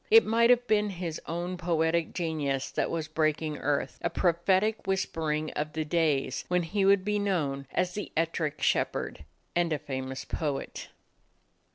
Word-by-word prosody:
It 450 Hz, +1 st, +8 dB
might 235 Hz, +1 st, +4 dB
have 245 Hz, 0 st, +5 dB
been 210 Hz, -2 st, +2 dB
his 175 Hz, -4 st, -4 dB
own 175 Hz, +2 st, -3 dB
poetic 165 Hz, -1 st, +1 dB
ge 165 Hz, -3 st, -2 dB
nius 140 Hz, -3 st, -2 dB
that -, -, 0 dB
was 160 Hz, -2 st, -2 dB
breaking 155 Hz, -1 st, 0 dB
earth; 140 Hz, -3 st, -1 dB
a -, -, 0 dB
prophetic 190 Hz, +5 st, +1 dB
whispering 160 Hz, -5 st, -1 dB
of 150 Hz, 0 st, -3 dB
the 155 Hz, -1 st, -2 dB
days 150 Hz, -5 st, +1 dB
when 180 Hz, 0 st, +1 dB
he 195 Hz, +4 st, 0 dB
would 195 Hz, -1 st, +4 dB
be 210 Hz, 0 st, +1 dB
known 145 Hz, -9 st, -1 dB
as 180 Hz, 0 st, 0 dB
the 205 Hz, -, -5 dB
"Ettrick 165 Hz, -2 st, -1 dB
Shepherd" -, -, 0 dB, 0.3 s
and 175 Hz, -1 st, +2 dB
a 155 Hz, -, +2 dB
fa 135 Hz, -2 st, -4 dB
mous 130 Hz, 0 st, -6 dB
poet. 145 Hz, -4 st, -3 dB
165 Hz, 170 wpm, -29 LUFS, 150-190 Hz, 0.3 s, It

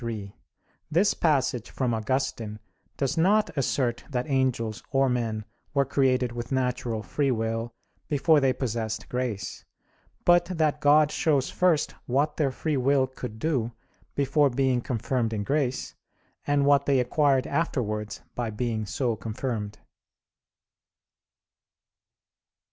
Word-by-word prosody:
3: 110 Hz, -4 st, -5 dB, 0.6 s
This 180 Hz, +6 st, +3 dB
passage 135 Hz, -7 st, +1 dB
from 125 Hz, -3 st, -1 dB
Augustine 115 Hz, -2 st, -2 dB, 0.4 s
does 140 Hz, +3 st, 0 dB
not 190 Hz, -1 st, +3 dB
assert 130 Hz, -3 st, 0 dB
that 125 Hz, -1 st, -2 dB
angels 130 Hz, -6 st, 0 dB
or 135 Hz, 0 st, +3 dB
men 115 Hz, -3 st, -1 dB, 0.3 s
were 140 Hz, 0 st, +3 dB
created 130 Hz, -2 st, +2 dB
with 120 Hz, +1 st, -6 dB
natural 125 Hz, -4 st, -1 dB
free 140 Hz, +6 st, 0 dB
will 115 Hz, -1 st, -1 dB, 0.4 s
before 150 Hz, +1 st, +4 dB
they 135 Hz, -2 st, +3 dB
possessed 115 Hz, -4 st, -3 dB
grace; 120 Hz, -8 st, -3 dB, 0.6 s
but 175 Hz, 0 st, +5 dB
that 155 Hz, -4 st, 0 dB
God 150 Hz, +1 st, +5 dB
shows 145 Hz, -5 st, +1 dB
first 175 Hz, -5 st, +2 dB
what 140 Hz, +5 st, +1 dB
their 150 Hz, -3 st, +2 dB
free 150 Hz, +3 st, -2 dB
will 135 Hz, +1 st, +3 dB
could 125 Hz, -4 st, -8 dB
do 120 Hz, -4 st, -1 dB, 0.4 s
before 145 Hz, +1 st, +3 dB
being 130 Hz, -1 st, +1 dB
confirmed 120 Hz, -1 st, -1 dB
in 105 Hz, -2 st, -2 dB
grace, 135 Hz, +1 st, -1 dB, 0.5 s
and 145 Hz, -1 st, +3 dB
what 140 Hz, 0 st, +4 dB
they 140 Hz, -2 st, +4 dB
acquired 135 Hz, +1 st, +2 dB
afterwards 110 Hz, -10 st, -2 dB
by 120 Hz, -2 st, -2 dB
being 110 Hz, -1 st, -2 dB
so 115 Hz, +5 st, -1 dB
confirmed. 110 Hz, -2 st, -4 dB
130 Hz, 125 wpm, -27 LUFS, 115-145 Hz, 0.6 s, but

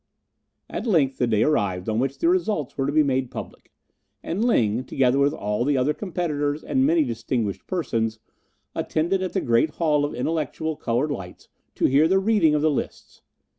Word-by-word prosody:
At -, -, -5 dB
length 145 Hz, -10 st, +2 dB
the 125 Hz, -, +2 dB
day 110 Hz, -2 st, +2 dB
arrived 100 Hz, -11 st, 0 dB
on 110 Hz, 0 st, 0 dB
which 135 Hz, +2 st, -1 dB
the -, -, 0 dB
results 220 Hz, -, 0 dB
were 135 Hz, -1 st, -1 dB
to -, -, 0 dB
be 155 Hz, +1 st, +4 dB
made 130 Hz, -2 st, 0 dB
public; -, -, -9 dB, 0.5 s
and 190 Hz, +7 st, -2 dB
Ling, 120 Hz, -, +2 dB
together 135 Hz, 0 st, +1 dB
with 140 Hz, +1 st, +3 dB
all 105 Hz, -5 st, -2 dB
the 140 Hz, +1 st, +1 dB
other 130 Hz, +4 st, +2 dB
competitors 150 Hz, -6 st, -2 dB
and 130 Hz, +1 st, +1 dB
many 165 Hz, 0 st, +3 dB
distinguished 115 Hz, -5 st, -3 dB
persons, 115 Hz, -11 st, -1 dB, 0.6 s
attended 170 Hz, +5 st, -1 dB
at 185 Hz, -, -3 dB
the 190 Hz, -, 0 dB
great 115 Hz, +6 st, +2 dB
Hall 150 Hz, -3 st, +2 dB
of 145 Hz, -, -2 dB
Intellectual 160 Hz, +3 st, -2 dB
Coloured 130 Hz, +4 st, -1 dB
Lights 95 Hz, -9 st, -8 dB, 0.3 s
to -, -, +1 dB
hear 145 Hz, +4 st, +4 dB
the 190 Hz, +3 st, +3 dB
reading 195 Hz, -6 st, +3 dB
of 150 Hz, -, 0 dB
the 155 Hz, -, +3 dB
lists. 140 Hz, -, -5 dB
145 Hz, 185 wpm, -24 LUFS, 120-160 Hz, 0.6 s, be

